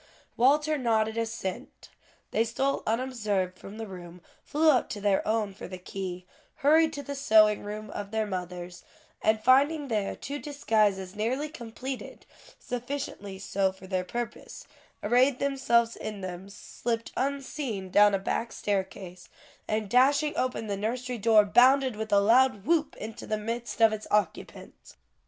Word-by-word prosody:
Walter 300 +4 +3
nodded 220 -3 +1
assent; 225 -5 -5 0.4
they 225 - +2
stole 265 +4 -1
unobserved 215 -6 -1
from 205 +2 -10
the 225 - -5
room, 180 -3 -10 0.2
flew 310 +1 +3
up 255 - +1
to 205 - -5
their 200 -1 +2
own 215 -2 0
for 210 - -9
the 185 - -7
key, 180 -1 -6 0.4
hurried 315 +2 +5
to 285 - -5
the 285 - -5
sewing 215 -6 +4
room 210 +1 -6
of 205 -1 -6
their 220 0 -1
mothers, 180 -2 -6 0.4
and 220 0 +2
finding 280 +3 +4
there 210 -3 -1
two 285 +2 -6
disguises 215 -10 0
nearly 255 +8 -1
completed, 255 0 -7 0.3
sufficiently 245 -6 -5
so 195 0 0
for 190 0 -14
their 185 -1 -1
purpose, 235 +4 -6 0.4
arrayed 250 +4 +3
themselves 235 -4 +1
in 210 -2 -6
them, 185 +1 -7
slipped 230 +3 -4
unseen 265 -7 -3
down 205 0 +6
a - - +2
back 225 +4 -2
staircase, 190 -3 -4 0.4
and 215 -1 -1
dashing 280 +6 +3
open 255 -3 -1
the 205 -2 -2
nursery 240 +4 -3
door, 215 0 +5
bounded 255 +3 +5
with 220 0 -5
a 200 - +6
loud 230 0 +4
whoop, 315 -1 +1
into 220 +1 -8
the 215 - -1
midst 230 +3 -4
of 225 -1 +6
its 215 0 -6
occupants. 210 -1 -3
220 Hz, 150 wpm, -28 LUFS, 200-255 Hz, 0.4 s, down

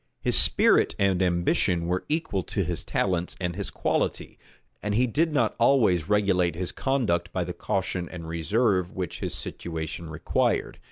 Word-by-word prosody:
His - - 0
spirit - - +5
and 95 -2 +2
ambition 85 -1 +1
were 90 +2 -1
equal 155 - -1
to 100 +2 -2
his 85 -1 -2
talents 90 -1 -1
and 90 -2 -2
his 100 -1 -4
quality; - - -2 0.4
and 105 0 -2
he 125 +3 +3
did 155 +7 +1
not 120 -7 +1
always 110 - +3
regulate 95 -5 +2
his 90 +1 -3
conduct 105 -11 -1
by 90 - -1
the 90 +1 -5
caution 90 -1 -2
and 85 -3 -8
reserve 90 +3 0
which 90 -4 -4
his - - -3
situation 80 0 -5
required. 80 0 -1
90 Hz, 160 wpm, -26 LUFS, 85-105 Hz, 0.4 s, spirit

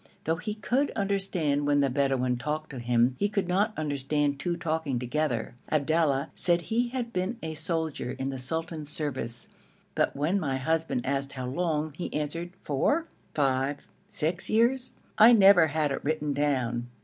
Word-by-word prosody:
Though 160 +1 0
he 210 +4 -4
could 250 +7 0
understand 190 -8 0
when 145 0 +3
the 140 - +3
Bedouin 130 -2 +1
talked 150 +4 -3
to 130 - -6
him, 120 +1 +2
he 205 - +2
could 200 -3 -1
not 200 +4 +2
understand 145 -1 0
two 170 +4 -1
talking 160 -5 -1
together. 125 -1 -1 0.2
Abdallah 155 -2 +1
said 175 -1 +2
he 235 +6 0
had 240 -2 -4
been 185 +6 -1
a 160 - -3
soldier 160 -4 -2
in 135 +1 -2
the 135 - -5
sultan's 160 +2 -2
service, 130 -6 -3 0.5
but - - +1
when 155 +8 +1
my 135 -6 -1
husband 160 -2 -1
asked 140 +1 -1
how 130 -2 -5
long 155 +2 -1
he 175 - -5
answered, 150 +3 -2
'Four, 290 - +1 0.3
five, 135 0 0 0.2
six 170 +4 -2
years. 245 +3 +2 0.3
I 215 - +10
have 240 -1 +7
never 195 -5 +7
had 150 -1 0
it 135 - -3
written 150 -1 -1
down.' 130 -5 0
155 Hz, 170 wpm, -28 LUFS, 135-180 Hz, 0.5 s, I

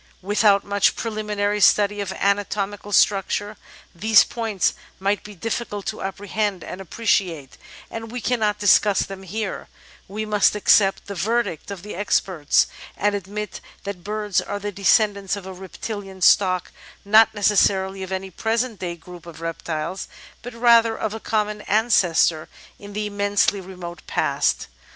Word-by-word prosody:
Without 205 0 +3
much 200 0 +2
preliminary 210 -2 -2
study 205 0 +4
of 195 -2 -4
anatomical 205 +1 -1
structure, 205 +1 +2 0.4
these 215 +5 +5
points 220 -5 -1 0.3
might 200 +2 0
be 210 -1 -11
difficult 205 0 -4
to 215 - -4
apprehend 200 -1 -2
and 185 - -7
appreciate, 180 - -1 0.4
and 225 0 -6
we 250 - -4
cannot 220 -3 0
discuss 205 -1 +4
them 195 -1 -6
here; 200 +2 -5 0.4
we 215 +3 -4
must 210 -1 +3
ac 210 - -6
cept 195 -2 +5
the 200 - -6
verdict 200 -2 -1
of 195 -3 -7
the 210 - -7
experts, 185 -5 +1 0.3
and 205 +1 +1
admit 205 +2 -5 0.2
that 195 -3 -6
birds 210 -1 -1
are - - -4
the 205 0 -4
descendants 200 0 +2
of 200 -2 -8
a 190 - -7
reptilian 195 +1 -7
stock 185 -1 +3 0.2
— - - -24
not 215 +2 +6
necessarily 195 -2 +2
of 190 0 -6
any 190 0 -4
present 225 +3 -1
day 175 -2 -4
group 175 0 -13
of 165 -1 -10
reptiles, 165 +1 -4 0.3
but 245 +1 -9
rather 230 -1 +4
of 215 -1 -3
a 220 - -5
common 210 -1 -1
ancestor 185 -7 +2 0.3
in 205 0 -11
the 210 +1 -2
immensely 205 -1 +1
remote 180 -3 -9
past. - - 0
205 Hz, 150 wpm, -22 LUFS, 190-210 Hz, 0.4 s, not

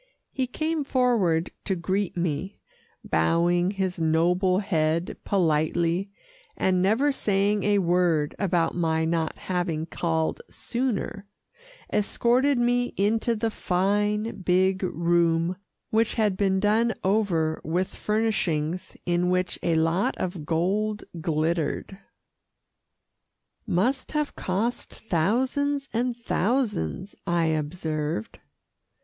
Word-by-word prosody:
He 260 -1 -1
came 310 +3 -1
forward 230 -12 +1
to 190 - 0
greet 185 +2 -2
me, 175 +3 -2 0.5
bowing 170 - +2
his 190 -2 -2
noble 175 +4 +2
head 170 -4 0
politely, 170 +1 +1 0.5
and 185 -1 +2
never 225 +10 +3
saying 205 -4 +1
a 205 +1 +2
word 175 -5 +2
about 180 -4 +1
my 160 -2 +1
not 165 -1 -1
having 175 -4 -2
called 165 - -1
sooner, 235 -5 -3 0.7
escorted 245 +6 +2
me 245 0 +1
into 220 +3 +1
the 225 +1 -1
fine, 205 +4 0
big 185 +1 +2
room, 170 -1 +1 0.4
which 225 +1 +2
had 210 -4 +2
been 190 -1 +1
done 220 +3 +2
over 185 -6 +1
with 180 +4 -1
furnishings 185 -6 -1
in 175 0 +1
which 180 0 0
a 170 -2 +1
lot 165 +4 +1
of 175 -5 -4
gold 205 +6 0 0.2
glittered. 165 +3 -1 1.7
"Must 230 - 0
have 300 -1 -1
cost 210 +6 -2
thousands 260 - 0
and 240 +1 0
thousands," 210 - -1
I 170 -1 +2
observed. 155 -5 -3
185 Hz, 105 wpm, -26 LUFS, 170-215 Hz, 1.7 s, never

